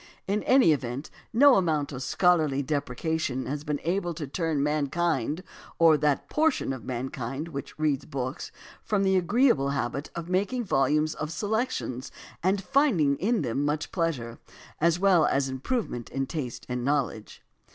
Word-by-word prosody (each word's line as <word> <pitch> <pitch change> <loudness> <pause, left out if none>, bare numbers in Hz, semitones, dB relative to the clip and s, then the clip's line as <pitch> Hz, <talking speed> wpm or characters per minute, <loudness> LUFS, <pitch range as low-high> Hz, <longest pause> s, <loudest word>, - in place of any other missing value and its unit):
In 205 +2 0
any 260 -9 +6
event 135 +1 -4 0.2
no 275 +3 +6
amount 155 -6 0
of 135 -2 -6
scholarly 155 -1 +2
deprecation 140 -1 -2
has 145 +2 -4
been 150 -2 -2
able 175 0 -1
to 155 -2 -4
turn 155 0 -1
mankind 150 +1 0 0.3
or 165 -2 +6
that 150 -1 +1
portion 305 - +1
of 130 -4 -8
mankind 130 +4 -4
which 140 -3 -7
reads 150 -3 0
books 130 +2 -4 0.3
from 205 -2 0
the 190 0 +3
agreeable 190 - +3
habit 140 +1 -2
of 170 -1 -5
making 200 +7 0
volumes 150 - +2
of 155 0 -5
selections 210 - -2 0.3
and 190 +2 +1
finding 215 - +3
in 215 -2 +1
them 130 +3 -1
much 150 +1 -1
pleasure, 140 -10 -2 0.4
as 170 +1 +3
well 185 -5 +4
as 135 0 +1
improvement 130 - -3
in 135 0 -2
taste 130 -4 -5
and 125 -1 -3
knowledge. 135 -6 -2
150 Hz, 150 wpm, -27 LUFS, 135-180 Hz, 0.4 s, any